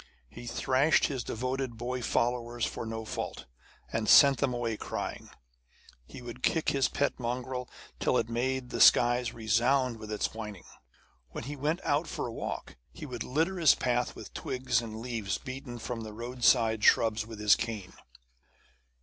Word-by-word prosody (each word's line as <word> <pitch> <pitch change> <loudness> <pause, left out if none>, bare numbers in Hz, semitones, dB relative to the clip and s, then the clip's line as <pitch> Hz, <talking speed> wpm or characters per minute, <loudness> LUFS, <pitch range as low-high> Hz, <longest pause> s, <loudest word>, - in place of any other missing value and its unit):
He 120 0 -10
thrashed 135 +6 +2
his 130 -4 -2
devoted 130 +1 -3
boy 125 +2 -3
followers 120 0 0
for 115 - -5
no 110 0 -5
fault, - - -5 0.5
and 110 -1 0
sent 140 -3 +8
them - - +1
away 120 -2 -2
crying. - - -5 0.8
He 125 - -10
would 120 +1 -8
kick 160 +3 +1
his 135 -2 +2
pet 145 - -1
mongrel 125 +1 -3 0.3
till - - +2
it 115 - 0
made 125 +2 -2
the - - -1
skies 120 -1 +6
resound 120 +3 +1
with 110 -1 -8
its 105 - -1
whinings. 105 -4 -7 0.6
When 65 - -7
he 145 +5 -5
went 150 +5 -1
out 145 +3 +1
for - - -4
a 120 - -5
walk, - - -5
he 155 - -9
would 125 -5 -7
litter 165 +7 0
his 160 -5 +6
path 125 -1 0
with - - -10
twigs 130 -1 -1
and 110 -1 -7
leaves 115 -6 -2
beaten 130 -1 -7
from 120 0 -5
the 110 -1 -7
roadside 115 -1 +2
shrubs 110 -1 +4
with 110 -2 -9
his 105 -1 +6
cane. 110 -5 -5
120 Hz, 165 wpm, -30 LUFS, 115-130 Hz, 0.8 s, sent